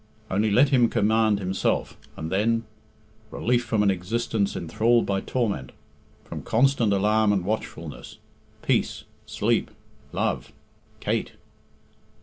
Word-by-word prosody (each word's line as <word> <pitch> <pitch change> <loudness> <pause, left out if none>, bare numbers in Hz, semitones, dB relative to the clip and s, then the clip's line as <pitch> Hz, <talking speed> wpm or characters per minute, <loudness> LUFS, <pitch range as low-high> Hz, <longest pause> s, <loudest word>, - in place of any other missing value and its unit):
Only 105 +3 +2
let 125 +7 +5
him 125 -4 +4
command 110 0 +2
himself, 95 -1 -1 0.2
and 80 +1 -5
then 115 +4 +1 0.7
relief 120 +1 0
from 110 -3 +1
an 100 - +4
existence 100 +2 -1
enthralled 115 +8 +2
by 95 -1 0
torment 105 - -2 0.5
from - - -6
constant 120 -2 +2
alarm 105 +2 +3
and 95 -3 0
watchfulness 110 +3 -5 0.5
peace - - 0 0.2
sleep - - 0 0.4
love - - -2 0.5
Kate! - - -1
110 Hz, 115 wpm, -25 LUFS, 100-115 Hz, 0.7 s, let